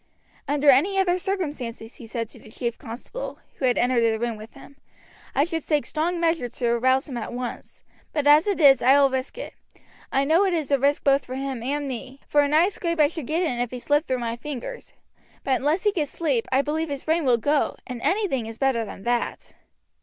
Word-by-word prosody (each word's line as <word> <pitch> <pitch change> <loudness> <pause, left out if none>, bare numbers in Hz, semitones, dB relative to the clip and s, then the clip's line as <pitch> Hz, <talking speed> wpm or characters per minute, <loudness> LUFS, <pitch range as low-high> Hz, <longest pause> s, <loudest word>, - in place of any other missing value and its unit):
"Under 290 0 +5
any 355 +10 +3
other 365 -1 +2
circumstances," 295 - -4
he 230 - -11
said 230 0 -3
to - - -14
the - - -15
chief 235 +1 -4
constable, 250 - -7 0.2
who 265 - -1
had 250 -1 +2
entered 245 0 +2
the 225 -1 +2
room 235 0 -2
with 215 +4 -12
him, 275 0 -15 0.6
"I 280 - +4
should 325 -1 -3
take 300 -2 +1
strong 335 +3 -1
measures 330 -8 0
to 240 -2 -1
arouse 260 +3 +2
him 260 -4 -5
at - - -5
once, 245 0 -7 0.3
but 295 -2 -1
as 295 +5 +6
it 400 -3 0
is 275 -4 +7
I 265 +3 +6
will 275 -1 +4
risk 260 - -3
it. - - -7 0.6
I 270 - +2
know 325 +6 +4
it 380 -3 +1
is 310 -4 -2
a 280 - +4
risk 280 +2 +2
both 275 0 +3
for 255 - -6
him 270 -2 -4
and 285 +4 -2
me, 260 +1 -7
for 295 - +4
a 290 - +2
nice 325 +7 +3
scrape 335 -2 -2
I 300 - +7
should 320 -7 -7
get 330 +4 0
in 250 -8 -1
if 245 -1 -1
he 250 - -6
slipped 290 +5 +1
through 260 - 0
my 235 -1 -3
fingers; 295 - -7 0.5
but 265 -2 +2
unless 305 +6 0
he 415 - +3
gets 310 -7 -2
sleep 280 -9 -1
I 265 +2 +3
believe 315 +2 -2
his 280 -1 -4
brain 320 +1 +1
will 250 -3 +4
go, 290 +5 +1
and 250 -3 -7
anything 360 - 0
is 225 0 -8
better 265 -4 +1
than 195 - -9
that." 240 +1 -2
275 Hz, 230 wpm, -24 LUFS, 245-320 Hz, 0.6 s, is